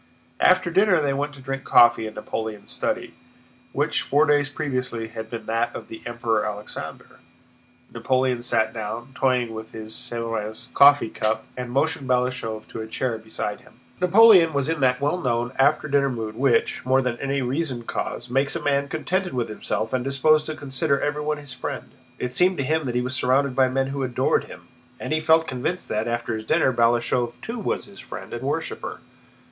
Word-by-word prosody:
After 175 Hz, -, +4 dB
dinner 190 Hz, 0 st, +4 dB
they 145 Hz, -2 st, +1 dB
went 145 Hz, +2 st, -2 dB
to 140 Hz, -, -13 dB
drink 135 Hz, +1 st, -4 dB
coffee 120 Hz, -2 st, +5 dB
in 110 Hz, -, -9 dB
Napoleon's 110 Hz, -1 st, -5 dB
study, -, -, -2 dB, 0.6 s
which -, -, 0 dB
four 145 Hz, +3 st, +3 dB
days 145 Hz, -2 st, +3 dB
previously 125 Hz, -5 st, -3 dB
had 110 Hz, -1 st, -7 dB
been 115 Hz, -1 st, -6 dB
that 115 Hz, +1 st, -1 dB
of -, -, -8 dB
the 110 Hz, -, -9 dB
Emperor 120 Hz, -2 st, 0 dB
Alexander. 105 Hz, 0 st, -7 dB, 0.7 s
Napoleon 130 Hz, -2 st, +1 dB
sat 110 Hz, -2 st, +1 dB
down, 115 Hz, +3 st, -5 dB
toying 125 Hz, -3 st, +1 dB
with 110 Hz, 0 st, -8 dB
his 110 Hz, 0 st, -8 dB
Sèvres 115 Hz, -2 st, -5 dB
coffee 140 Hz, -4 st, +6 dB
cup, 110 Hz, +1 st, -1 dB
and 125 Hz, -1 st, -5 dB
motioned 140 Hz, +2 st, 0 dB
Balashëv 125 Hz, -3 st, -1 dB
to 110 Hz, -, -6 dB
a 110 Hz, -, -6 dB
chair 115 Hz, 0 st, -2 dB
beside 110 Hz, -1 st, -5 dB
him. -, -, -21 dB, 0.2 s
Napoleon 180 Hz, -3 st, +7 dB
was 140 Hz, -1 st, 0 dB
in 165 Hz, -1 st, -1 dB
that 125 Hz, -1 st, +2 dB
well 150 Hz, +6 st, 0 dB
known 120 Hz, -1 st, 0 dB
after 145 Hz, +3 st, +3 dB
dinner 140 Hz, -1 st, +2 dB
mood 110 Hz, -4 st, -4 dB
which, 125 Hz, -1 st, +1 dB
more 130 Hz, +1 st, +3 dB
than 125 Hz, -2 st, -1 dB
any 140 Hz, 0 st, -1 dB
reasoned 130 Hz, -2 st, -2 dB
cause, 120 Hz, -, -4 dB
makes 135 Hz, +3 st, 0 dB
a -, -, -3 dB
man 140 Hz, 0 st, +1 dB
contented 180 Hz, +5 st, -2 dB
with 120 Hz, -2 st, -1 dB
himself 110 Hz, +1 st, -3 dB
and 130 Hz, -1 st, 0 dB
disposed 150 Hz, +3 st, +3 dB
to 155 Hz, -, -4 dB
consider 140 Hz, +1 st, -1 dB
everyone 150 Hz, +1 st, -1 dB
his 145 Hz, -3 st, -10 dB
friend. 125 Hz, -, -6 dB, 0.3 s
It 125 Hz, 0 st, -4 dB
seemed 185 Hz, +1 st, +3 dB
to 140 Hz, -, 0 dB
him 155 Hz, +1 st, 0 dB
that 120 Hz, -, -3 dB
he 125 Hz, -, +2 dB
was 125 Hz, +1 st, -3 dB
surrounded 130 Hz, +1 st, +2 dB
by 130 Hz, 0 st, +4 dB
men 135 Hz, +1 st, 0 dB
who 140 Hz, 0 st, -3 dB
adored 125 Hz, -2 st, +1 dB
him: -, -, -13 dB, 0.3 s
and -, -, -3 dB
he 155 Hz, -, +2 dB
felt 160 Hz, +1 st, +4 dB
convinced 130 Hz, +7 st, -3 dB
that, 110 Hz, +2 st, -1 dB
after 120 Hz, 0 st, -2 dB
his 110 Hz, 0 st, -6 dB
dinner, 155 Hz, -5 st, +3 dB
Balashëv 120 Hz, +1 st, +2 dB
too 235 Hz, +1 st, -4 dB
was 210 Hz, -, -2 dB
his 200 Hz, -1 st, -15 dB
friend -, -, -8 dB
and 120 Hz, -, -4 dB
worshiper. 145 Hz, +4 st, -3 dB
130 Hz, 190 wpm, -24 LUFS, 115-145 Hz, 0.7 s, Napoleon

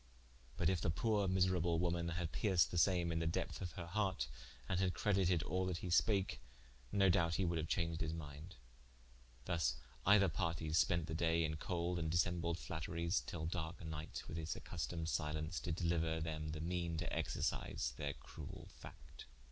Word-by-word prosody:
But -, -, +2 dB
in 95 Hz, -2 st, +2 dB
the 95 Hz, -, +1 dB
poore 100 Hz, +5 st, +2 dB
miserable 90 Hz, -2 st, +3 dB
woman 85 Hz, 0 st, 0 dB
had 85 Hz, -1 st, -2 dB
perced 95 Hz, -6 st, +3 dB
the 85 Hz, -, +1 dB
same 85 Hz, -2 st, +3 dB
in 80 Hz, -, 0 dB
the 80 Hz, -, 0 dB
depth 80 Hz, -, -2 dB
of 90 Hz, -3 st, -4 dB
her 85 Hz, -, -5 dB
harte, 90 Hz, -8 st, 0 dB, 0.4 s
and 95 Hz, -, +1 dB
had 95 Hz, -1 st, +1 dB
credited 95 Hz, -5 st, +2 dB
all 95 Hz, +4 st, 0 dB
that 90 Hz, -2 st, -1 dB
he 90 Hz, -, -2 dB
spake, 95 Hz, +4 st, +3 dB, 0.5 s
no 100 Hz, -1 st, +4 dB
doubte 85 Hz, -2 st, +3 dB
he 95 Hz, -, +2 dB
woulde 85 Hz, -1 st, 0 dB
haue 80 Hz, -, -2 dB
chaunged 85 Hz, -1 st, 0 dB
his 80 Hz, -1 st, 0 dB
minde. 80 Hz, +1 st, -7 dB, 0.9 s
Thus 80 Hz, -8 st, +1 dB, 0.3 s
either 100 Hz, 0 st, +6 dB
partes 80 Hz, -1 st, +2 dB
spente 85 Hz, -3 st, 0 dB
the 80 Hz, -, -4 dB
daye 85 Hz, 0 st, +2 dB
in 75 Hz, 0 st, -2 dB
cold 85 Hz, +1 st, -1 dB
and 80 Hz, -1 st, -1 dB
dissembled 85 Hz, 0 st, +1 dB
flatteries 85 Hz, +2 st, -1 dB
till 80 Hz, -2 st, -3 dB
darke 80 Hz, 0 st, -3 dB
nighte, 80 Hz, -1 st, -5 dB
with 80 Hz, -, -5 dB
his 80 Hz, -1 st, -2 dB
accustomed 85 Hz, -1 st, -4 dB
silence, 80 Hz, +1 st, -1 dB
did 80 Hz, -2 st, -3 dB
deliuer 80 Hz, -2 st, +1 dB
them 75 Hz, -1 st, -3 dB
the 75 Hz, 0 st, -4 dB
meane 85 Hz, -1 st, -1 dB
to 85 Hz, -, -2 dB
exercise -, -, -1 dB
their -, -, -2 dB
cruell 75 Hz, -3 st, -9 dB
facte. -, -, -12 dB
85 Hz, 180 wpm, -38 LUFS, 80-90 Hz, 0.9 s, either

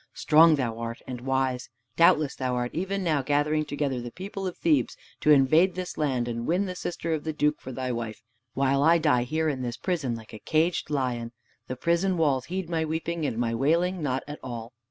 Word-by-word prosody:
Strong 160 Hz, +1 st, +6 dB
thou 120 Hz, -5 st, -2 dB
art, 115 Hz, 0 st, -4 dB
and 125 Hz, -2 st, -6 dB
wise. 130 Hz, -1 st, -1 dB, 0.3 s
Doubtless 155 Hz, -4 st, +4 dB
thou 130 Hz, -1 st, -2 dB
art 120 Hz, 0 st, -2 dB
even 195 Hz, +3 st, -2 dB
now 155 Hz, -5 st, +1 dB
gathering 145 Hz, +3 st, +1 dB
together 145 Hz, -3 st, -2 dB
the 120 Hz, -, -6 dB
people 195 Hz, -, -6 dB
of 180 Hz, -, -6 dB
Thebes 150 Hz, -7 st, +1 dB, 0.2 s
to -, -, +1 dB
invade 155 Hz, +6 st, +5 dB
this 185 Hz, -1 st, -5 dB
land 130 Hz, -5 st, 0 dB
and 115 Hz, 0 st, -3 dB
win 180 Hz, +5 st, +1 dB
the 185 Hz, -, -4 dB
sister 170 Hz, -2 st, -3 dB
of 155 Hz, -2 st, -2 dB
the 155 Hz, -, -3 dB
Duke 150 Hz, 0 st, 0 dB
for 130 Hz, -, -7 dB
thy 130 Hz, 0 st, -3 dB
wife, 115 Hz, -3 st, -5 dB, 0.3 s
while 135 Hz, 0 st, +2 dB
I 165 Hz, +3 st, +5 dB
die 125 Hz, -6 st, +3 dB
here 160 Hz, +4 st, 0 dB
in 140 Hz, -4 st, -1 dB
this 120 Hz, -2 st, -4 dB
prison 155 Hz, -10 st, -1 dB
like 115 Hz, -1 st, -11 dB
a 110 Hz, -, -8 dB
caged 160 Hz, +6 st, 0 dB
lion. 125 Hz, -5 st, -2 dB, 0.3 s
The 130 Hz, -, -4 dB
prison 170 Hz, +6 st, +1 dB
walls 140 Hz, -6 st, +1 dB
heed 185 Hz, 0 st, -4 dB
my 165 Hz, -1 st, 0 dB
weeping 160 Hz, 0 st, -2 dB
and 115 Hz, -, -3 dB
my 115 Hz, -1 st, 0 dB
wailing 170 Hz, +8 st, +1 dB
not 130 Hz, -3 st, -1 dB
at 150 Hz, 0 st, -7 dB
all." 120 Hz, -2 st, -7 dB
145 Hz, 215 wpm, -27 LUFS, 125-165 Hz, 0.3 s, Strong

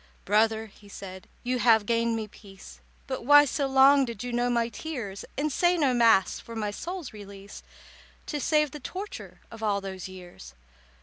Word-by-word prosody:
"Brother," 220 Hz, +2 st, +2 dB
he 205 Hz, -1 st, -18 dB
said, 190 Hz, -1 st, -10 dB, 0.2 s
"you 250 Hz, 0 st, -1 dB
have 225 Hz, -3 st, +4 dB
gained 230 Hz, +1 st, +1 dB
me 220 Hz, -1 st, -4 dB
peace, 195 Hz, -2 st, -14 dB, 0.3 s
But 260 Hz, -3 st, -5 dB
why 290 Hz, +3 st, +7 dB
so 280 Hz, +1 st, -1 dB
long 270 Hz, +1 st, +6 dB
did 235 Hz, -4 st, -5 dB
you 245 Hz, -1 st, -5 dB
know 245 Hz, +1 st, +1 dB
my 235 Hz, -1 st, +1 dB
tears, 235 Hz, -6 st, -6 dB
And 300 Hz, +2 st, 0 dB
say 350 Hz, 0 st, +2 dB
no 280 Hz, -6 st, +2 dB
Mass 225 Hz, -6 st, +4 dB
for 230 Hz, -, -10 dB
my 210 Hz, -2 st, -2 dB
soul's 345 Hz, -, -6 dB
release, 200 Hz, -1 st, -11 dB, 0.6 s
To 295 Hz, -, -4 dB
save 300 Hz, 0 st, +2 dB
the 300 Hz, -, -8 dB
torture 380 Hz, +9 st, -8 dB
of 225 Hz, -, -11 dB
all 205 Hz, -2 st, +1 dB
those 190 Hz, -2 st, -7 dB
years?" 175 Hz, -, -12 dB
230 Hz, 180 wpm, -27 LUFS, 205-270 Hz, 0.6 s, why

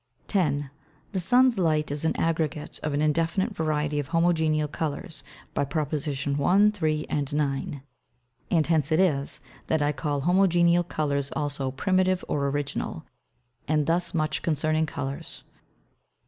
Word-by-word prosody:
10. 145 Hz, -8 st, 0 dB, 0.4 s
The 195 Hz, -, -1 dB
Sun's 245 Hz, +5 st, +4 dB
Light 155 Hz, -4 st, +1 dB
is 145 Hz, +1 st, -3 dB
an 160 Hz, -, +1 dB
Aggregate 160 Hz, -2 st, -1 dB
of 150 Hz, -2 st, -2 dB
an 145 Hz, -, +1 dB
indefinite 165 Hz, +7 st, +1 dB
variety 150 Hz, -3 st, 0 dB
of 145 Hz, -, -3 dB
Homogeneal 160 Hz, -3 st, +2 dB
Colours, 155 Hz, 0 st, -4 dB, 0.3 s
by -, -, +1 dB
Prop. 150 Hz, +1 st, -2 dB
1, 145 Hz, +7 st, +2 dB
3, 155 Hz, -6 st, -1 dB
and 145 Hz, -1 st, -2 dB
9. 140 Hz, -1 st, -2 dB, 0.7 s
And 160 Hz, -3 st, +3 dB
hence 160 Hz, -3 st, +1 dB
it 155 Hz, -, +3 dB
is, 145 Hz, -7 st, +1 dB, 0.3 s
that 160 Hz, -2 st, +1 dB
I 145 Hz, -, +2 dB
call 145 Hz, -2 st, -2 dB
Homogeneal 175 Hz, -1 st, +4 dB
Colours 140 Hz, -4 st, -1 dB
also 145 Hz, -3 st, -1 dB
Primitive 185 Hz, +6 st, +1 dB
or 140 Hz, -1 st, 0 dB
Original. 145 Hz, 0 st, -3 dB, 0.6 s
And 150 Hz, -1 st, +2 dB
thus 170 Hz, +2 st, 0 dB
much 155 Hz, -1 st, 0 dB
concerning 155 Hz, 0 st, +1 dB
Colours. 140 Hz, -3 st, -6 dB
155 Hz, 140 wpm, -26 LUFS, 145-170 Hz, 0.7 s, Sun's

